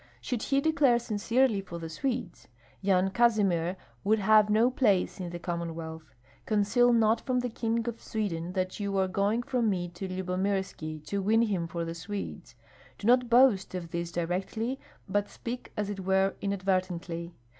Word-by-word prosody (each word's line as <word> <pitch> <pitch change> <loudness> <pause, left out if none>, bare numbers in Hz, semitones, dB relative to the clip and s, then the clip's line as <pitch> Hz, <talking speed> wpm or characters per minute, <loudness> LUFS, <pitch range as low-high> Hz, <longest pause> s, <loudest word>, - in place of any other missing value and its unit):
Should 220 - -3
he 275 - +1
declare 295 -6 +4
sincerely 230 0 +1
for 180 -3 -8
the 165 -1 -6
Swedes, 175 - -4 0.3
Yan 190 -1 +2
Kazimir 195 -6 +2 0.3
would 215 +2 +3
have 215 +1 +5
no 225 +4 +4
place 205 -8 +2
in 180 -2 -4
the 175 - -5
Commonwealth. 165 -2 -5 0.3
Conceal 220 +3 +3
not 225 -1 +3
from 255 -2 0
the 245 -1 -3
King 230 0 -1
of 235 -1 -4
Sweden 180 -5 -3
that 185 +1 -2
you 200 -1 -1
are 190 0 +2
going 200 +5 0
from 245 -3 +1
me 175 -3 -1
to 175 +3 -6
Lyubomirski 185 -4 -2
to 200 +5 -2
win 220 +4 +3
him 190 -7 -1
for 170 0 -3
the 165 - -4
Swedes. 195 +4 -6 0.4
Do - - -8
not 245 +1 +4
boast 235 -7 +4
of 170 -2 -5
this 170 -1 -3
directly, 190 +9 -2 0.3
but 205 +1 0
speak 245 +1 -6
as 210 -1 -1
it 205 -1 -4
were 190 +1 +2
inadvertently. 185 -3 -2
195 Hz, 165 wpm, -29 LUFS, 175-230 Hz, 0.4 s, have